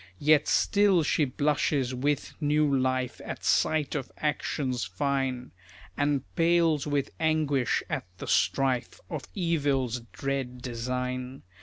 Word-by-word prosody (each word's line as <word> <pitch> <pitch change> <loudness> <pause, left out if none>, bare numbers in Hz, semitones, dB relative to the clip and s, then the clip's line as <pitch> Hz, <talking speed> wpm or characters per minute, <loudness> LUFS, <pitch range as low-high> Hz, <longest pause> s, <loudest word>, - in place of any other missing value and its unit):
Yet 150 +3 +4
still 200 -4 +3
she 150 0 +2
blushes 140 -1 0
with 140 +3 -1
new 150 -1 +2
life 130 -1 0
At - - -6
sight 155 -2 +2
of 135 -3 -4
actions 140 -4 -1
fine, 130 +5 -2 0.4
And 145 -2 +1
pales 165 -3 +3
with 145 -2 -1
anguish 155 -5 +1
at - - -3
the - - -7
strife 130 -3 +1
Of 155 -5 -4
evil's 140 - 0
dread 135 -2 -3
design. 125 +2 -4
140 Hz, 120 wpm, -28 LUFS, 130-150 Hz, 0.4 s, Yet